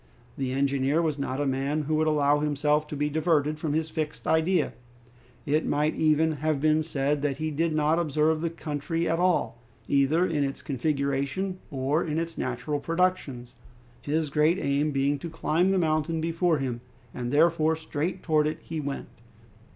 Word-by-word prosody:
The 130 -2 -2
engineer 140 +2 +1
was 155 -4 0
not 135 -1 -2
a 145 - 0
man 140 +3 -1
who 155 +2 -2
would 155 0 +2
allow 145 -1 +3
himself 150 +1 +1
to 150 - -6
be 145 +1 0
diverted 155 -1 +1
from 155 -2 -2
his 160 0 -1
fixed 155 -2 -4
idea. 160 +1 +2 0.7
It 150 +3 +1
might 150 +2 +1
even 160 +1 +2
have 155 0 0
been 155 +1 +3
said 145 -2 -1
that 140 -2 -1
he 155 +1 -2
did 165 +3 0
not 155 +2 +2
observe 155 0 +1
the 170 - 0
country 165 +1 -3
at 165 - 0
all, 175 -9 +1 0.3
either 140 +5 +3
in 155 -5 0
its 135 0 -4
configuration 140 +6 -1
or 140 +4 0
in 155 -1 -2
its 165 0 -3
natural 130 +4 -2
productions, 165 -9 -1 0.5
his 150 0 -1
great 155 +4 +3
aim 145 -2 0
being 140 0 0
to 170 - -6
climb 165 +2 +1
the 195 - +2
mountain 160 -1 0
before 165 +1 +1
him, 125 -4 -3 0.3
and 120 -1 -4
therefore 160 +1 +3
straight 160 +3 -4
towards 155 -2 +2
it 155 - -5
he 160 -1 -5
went. 140 -2 -4
150 Hz, 175 wpm, -27 LUFS, 140-160 Hz, 0.7 s, allow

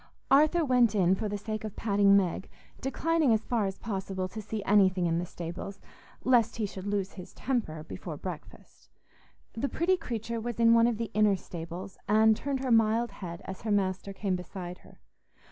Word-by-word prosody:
Arthur 310 +4 +5
went 245 -5 +3
in 185 -2 +4
for 210 +2 -2
the 205 - -2
sake 215 +1 -5
of 215 -2 -6
patting 200 -2 +4
Meg, 190 -1 -1 0.3
declining 310 +1 +1
as 220 0 0
far 225 -5 +1
as 195 - -5
possible 190 -3 -3
to 215 - -6
see 215 0 -5
anything 190 -3 +4
in 165 0 +1
the 175 - -3
stables, 175 +4 -7 0.4
lest 245 -3 +3
he 220 - -1
should 195 -1 -7
lose 200 -2 -1
his 180 -2 -11
temper 215 - -2
before 95 -9 -7
breakfast. - - -9 0.6
The 270 +5 -2
pretty 370 +3 +1
creature 230 - -4
was 235 0 -4
in 230 0 +6
one 230 0 +6
of 235 -2 0
the 230 0 -4
inner 210 -1 +4
stables, 175 +2 -8
and 220 +1 +5
turned 275 +2 -3
her 260 -2 -1
mild 225 0 +3
head 175 -4 -8
as 190 - -7
her 220 - -2
master 195 -1 0
came 195 -1 -1
beside 180 0 -7
her. - - -19
210 Hz, 190 wpm, -29 LUFS, 190-230 Hz, 0.6 s, in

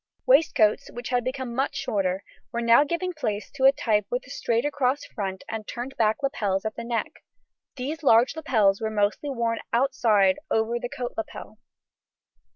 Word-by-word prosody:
] - - -50
Waistcoats, 280 - +3
which 240 0 -7
had 245 -1 +1
become 255 -1 -4
much 270 +3 -1
shorter, 200 -7 -1 0.3
were 235 - -2
now 235 +3 +5
giving 340 +4 -2
place 210 - -3
to 265 -2 0
a 270 - +9
type 215 -7 0
with 245 +1 -2
a 255 - -13
straight 235 0 0
across 285 -1 0
front 190 -2 -5
and 220 -1 -5
turned 250 +3 -6
back 220 +5 +1
lapels 205 -7 -1
at 220 - -2
the - - -6
neck; 235 -1 -3 0.5
these 280 +5 -4
large 245 -2 +4
lapels 220 -11 +2
were 220 - -1
mostly 210 +6 0
worn 235 -3 -1
outside 230 -6 +3
over 225 +2 +1
the 245 - -5
coat 245 0 -5
lapel. 335 - -7
240 Hz, 175 wpm, -25 LUFS, 215-270 Hz, 0.5 s, a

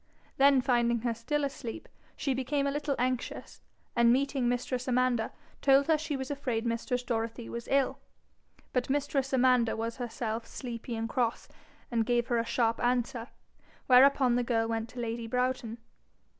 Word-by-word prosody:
Then 275 -1 +6
finding 240 -3 +2
her 235 0 0
still 290 +6 -2
asleep 265 -4 -5 0.3
she 275 - -1
became 270 +2 -1
a 280 - +1
little 290 -1 -1
anxious, 255 0 -3 0.3
and 235 -1 +5
meeting 265 -1 +1
mistress 250 +1 -2
Amanda, 250 -2 +1 0.3
told 275 0 +5
her 320 - +4
she 305 -2 -3
was 265 +1 -5
afraid 250 -5 -2
mistress 235 +2 -1
Dorothy 230 -1 -3
was 235 0 -6
ill. 275 -1 +2 0.7
But 250 0 0
mistress 275 -1 0
Amanda 250 -3 +3
was 230 +1 -3
herself 230 -2 -4
sleepy 235 -1 -6
and 225 0 -2
cross, 235 -2 -1 0.4
and 230 -1 +2
gave 240 0 0
her 240 -1 +2
a 230 - -1
sharp 230 -1 0
answer, 245 -1 0 0.6
whereupon 260 0 +6
the 245 - +1
girl 225 -2 +1
went 225 0 -2
to 250 - -9
lady 230 0 -3
Broughton. 250 -1 -1
245 Hz, 160 wpm, -30 LUFS, 230-270 Hz, 0.7 s, Then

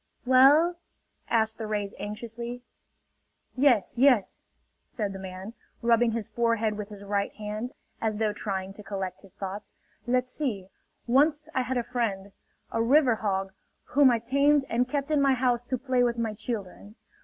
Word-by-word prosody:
"Well...?" 285 +7 +6 0.5
asked 220 -1 +1
the 220 - -4
rays 205 -2 -2
anxiously. 235 +4 -6 0.9
"Yes... 245 -6 +2
yes 250 -7 +4 0.2
..." - - -46
said 205 -4 -3
the 195 - -7
man, 190 +3 -8 0.3
rubbing 235 0 +3
his 230 -2 -3
forehead 230 -1 0
with 210 0 -6
his 205 -1 -10
right 200 0 -1
hand, 215 +3 -5 0.3
as 220 -2 -1
though 215 -1 0
trying 195 -2 -4
to 210 - -11
collect 195 -3 -5
his 195 -1 -17
thoughts. 200 +1 -6 0.3
"Let's 250 +1 +1
see.... 210 -12 -3 0.4
Once 295 +5 +2
I 260 - +1
had 255 +1 -2
a 240 - 0
friend, 205 -6 -2 0.4
a 225 - 0
river 250 0 +4
hog, 195 -2 -2 0.4
whom 280 -1 +6
I 240 - +3
tamed 280 +4 +2
and 245 +2 +1
kept 285 +2 -2
in 295 -2 +3
my 275 -1 +4
house 245 -1 +1
to 255 +1 -2
play 255 0 0
with 240 -1 +1
my 225 -2 -1
children. 210 -2 -6
230 Hz, 165 wpm, -27 LUFS, 205-255 Hz, 0.9 s, Well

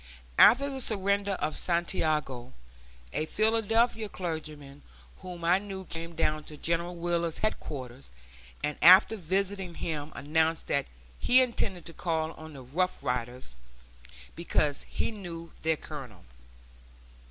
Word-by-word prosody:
After 275 +4 +8
the 270 -1 -1
surrender 200 -2 +1
of 155 -4 -2
Santiago, 155 -7 0 0.6
a 155 - -1
Philadelphia 225 +1 +2
clergyman 155 -6 -6 0.4
whom 175 -2 -8
I 180 +3 +5
knew 195 -2 -7
came 165 0 -6
down 155 -1 0
to 150 - -8
General 170 +3 -1
Wheeler's 170 -1 -1
headquarters, 135 - -4 0.5
and 150 0 -2
after 185 +5 +8
visiting 190 -1 -2
him 155 -2 -4
announced 160 +3 +1
that 140 -1 0 0.3
he 250 +1 +6
intended 220 -8 0
to 165 - -6
call 160 -2 -1
on 160 -1 -11
the 135 -2 -10
Rough 170 +6 -1
Riders, 125 - -2 0.8
because 150 -4 0
he - - -1
knew 170 -6 -8
their 160 0 +1
colonel. - - -9
170 Hz, 125 wpm, -29 LUFS, 155-195 Hz, 0.8 s, After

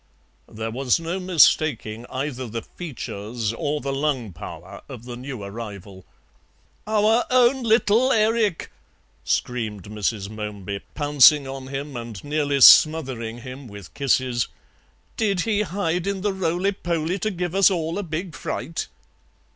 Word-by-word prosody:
There 110 +1 -5
was 130 +4 +1
no 170 +3 -3
mistaking 150 - +2
either 130 -1 -4
the 115 0 -5
features 115 - -5
or 145 +5 -2
the 135 0 -3
lung 135 -8 -1
power 85 +4 -9
of 120 -4 -9
the 120 -1 -7
new 125 -3 -7
arrival. 100 -2 -8 0.8
"Our 220 +2 +3
own 255 +1 +4
little 230 +2 +3
Erik," 220 -5 +1 0.5
screamed 110 -6 -2
Mrs. 105 0 -3
Momeby, 100 -2 -6
pouncing 145 -1 +5
on 135 0 -7
him 140 +1 -5
and 115 -5 -7
nearly 145 -2 0
smothering 125 -6 +6
him 130 +2 -9
with 100 -4 -11
kisses; 130 -4 +1 0.7
"did 200 -4 +1
he 210 -1 +1
hide 180 -3 -1
in 200 -1 -2
the 205 0 0
roly 185 +1 0
poly 170 -1 -2
to 215 - 0
give 180 -3 -3
us 195 0 +6
all 165 -1 -2
a - - -1
big 170 0 -5
fright?" 165 - -4
140 Hz, 140 wpm, -23 LUFS, 115-180 Hz, 0.8 s, smothering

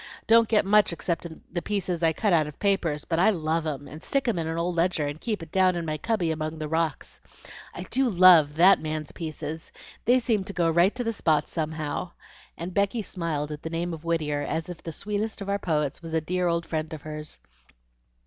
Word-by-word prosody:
don't 230 0 +5
get 210 -3 +3
much 210 0 +4
except 170 0 -3 0.3
the 175 - -1
pieces 185 -2 -2
I 165 -1 +4
cut 200 +4 0
out 155 -3 +3
of 150 - -9
papers, 175 -7 0
but 165 -1 -1
I 190 - +5
love 160 -4 0
'em, 145 -2 -4
and 155 +2 -10
stick 275 +5 0
'em 215 -7 +1
in 160 - -2
an 165 0 -3
old 170 +1 -1
ledger, 170 -3 +1
and 145 +2 -5
keep 215 -7 -2
it 160 - -12
down 185 -1 +3
in 170 -1 -3
my 155 -1 -3
cubby 190 -4 0
among 155 0 -3
the 155 -1 -4
rocks. 160 -1 -2 0.5
I 180 - -7
do 260 +6 +1
love 175 -6 +6
THAT 180 +4 +6
man's 155 -1 -4
pieces. 160 -1 -6 0.3
They 245 +3 +5
seem 230 -5 +1
to 200 - -6
go 170 -3 +2
right 175 +6 +3
to 250 - -2
the 230 -1 -1
spot 155 -7 +1
somehow;" 155 +1 -3 0.4
and 175 +2 -5
Becky 200 +3 +1
smiled 155 -5 -3
at 150 0 -6
the 160 - -5
name 170 +1 -2
of 160 -1 -8
Whittier 155 -3 -1
as 160 +3 -3
if 175 - -8
the 165 - -6
sweetest 210 +6 -3
of 200 -1 -6
our 200 0 0
poets 150 -5 -1
was 165 -1 -5
a - - +3
dear 180 +3 -1
old 170 0 0
friend 155 0 -3
of 155 - -8
hers. 155 0 -6
170 Hz, 225 wpm, -26 LUFS, 155-195 Hz, 0.5 s, love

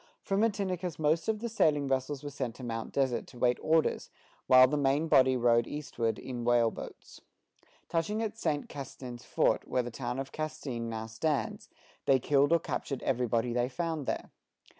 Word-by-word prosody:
From 195 0 0
Matinicus 190 -6 -1
most 155 +1 +1
of 220 -1 0
the 235 - -2
sailing 150 -10 +2
vessels 135 +2 -1
were 145 - -5
sent 125 -4 -4
to 130 - -10
Mount 115 -1 -4
Desert 130 -3 0
to - - -14
wait 125 0 +2
orders, 160 0 +1 0.4
while 130 0 +8
the 150 - -1
main 145 +2 +2
body 130 -4 +5
rowed 120 -1 +3
eastward 125 -6 -2
in 125 -2 -6
whale 120 -1 +3
boats. - - -10 0.7
Touching 205 +7 -1
at 220 -1 -3
Saint 155 -9 -1
Castin's 130 -3 -8
fort, - - +1
where 125 - +1
the 120 - -6
town 120 +1 -4
of 135 0 -4
Castine 130 -6 -4
now 110 -1 -4
stands, 140 +7 -2 0.4
they 135 - +6
killed 140 +3 +2
or 170 - +6
captured 140 -4 -4
everybody 120 -2 0
they 120 +1 +1
found 160 0 -3
there. - - -3
135 Hz, 180 wpm, -30 LUFS, 120-155 Hz, 0.7 s, while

